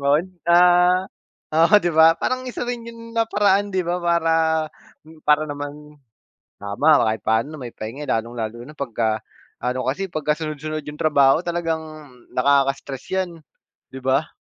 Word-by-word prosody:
'Yun 145 +4 +2 0.2
ah 180 +1 +5 0.4
oo 165 +6 +4
'di 175 - 0
ba 160 +1 +7
parang 255 0 -2
isa 245 - -6
rin 240 -1 -4
'yun 230 0 -11
na 225 - +3
paraan 205 -1 +2
'di 185 - +1
ba 175 +1 -1
para 170 -1 +1 0.9
para 150 +1 +4
naman 145 +1 -8 0.6
tama 140 +10 +3
kahit 110 -2 0
paano 110 +5 +1
na - - -11
may 120 - -7
pahinga 115 +7 -7
lalong-lalo 115 0 -3
na 150 +3 -13
pagka 110 -5 -2 0.3
ano 125 +1 -2
kasi 145 +9 -1
pagkasunod-sunod 155 0 -3
yung 150 0 -9
trabaho 140 -1 +4
talagang 170 -2 -2 0.5
nakaka-stress 135 0 +1 0.2
yan, 175 - -11 0.6
'di 135 - -8
ba? 135 +4 +1
150 Hz, 145 wpm, -22 LUFS, 135-175 Hz, 0.9 s, ba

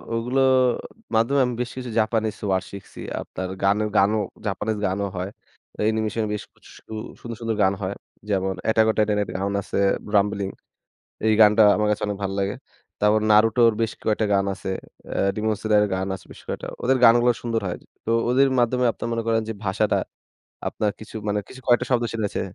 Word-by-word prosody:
ওগুলোর 130 +3 +2 0.6
মাধ্যমে 120 +5 +3
আমি 125 - -2
বেশ 125 - -2
কিছু 125 -1 -5
জাপানিজ 110 -1 0
ওয়ার্ড 95 -1 +1
শিখছি। 100 -1 -11 0.2
আপনার 95 0 -5 0.2
গানের 105 +2 +2
গানও 105 +2 +4 0.3
জাপানিজ 105 +2 -2
গানও 100 +2 -1
হয়। 90 +2 -3 0.5
অ্যানিমেশনে 110 0 0
বেশ 105 - -4
কিছু - - -20 0.5
সুন্দর, 115 -1 -7
সুন্দর 115 -1 -1
গান 95 +1 +3
হয়। 95 +1 -2 0.3
যেমন 95 -1 0
অ্যাটাক 110 0 +4
অন - - +3
টাইটানের 105 -2 +2
গান 100 +1 -1
আছে 100 - -4 0.4
রাম্বলিং। 100 -1 +2 0.8
এই 110 - +4
গানটা 105 +1 +7
আমার 105 0 +1
কাছে 105 +1 -1
অনেক 100 -1 -3
ভালো 95 0 -2
লাগে। 100 +1 -1 0.5
তারপর 105 +1 +4
নারুটোর 115 +2 +5
বেশ 115 - 0
কয়েকটা 110 0 +1
গান 100 0 +2
আছে। 95 - -6 0.7
রিমন 110 0 0
সদর 105 -1 +3
গান 95 +1 -2
আছে - - -13
বেশ - - -12
কয়েকটা। - - -4 0.2
ওদের 130 +1 +3
গানগুলো 120 +1 +7
সুন্দর 115 -2 -1
হয়। 90 - -3 0.3
তো - - -3 0.2
ওদের 135 +2 +4
মাধ্যমে 125 +1 +2
আপনারা 115 - -5
মনে 115 -1 -1
করেন 115 0 +2
যে, - - -2
ভাষাটা 100 +3 +1 0.7
আপনার 105 -1 -1
কিছু 110 - -11
মানে 105 0 +1
কিছু 130 - -11
কয়েকটা 120 -1 +3
শব্দ 120 -1 +2
শুনেছে। 105 -3 -2
110 Hz, 175 wpm, -23 LUFS, 100-115 Hz, 0.8 s, গানটা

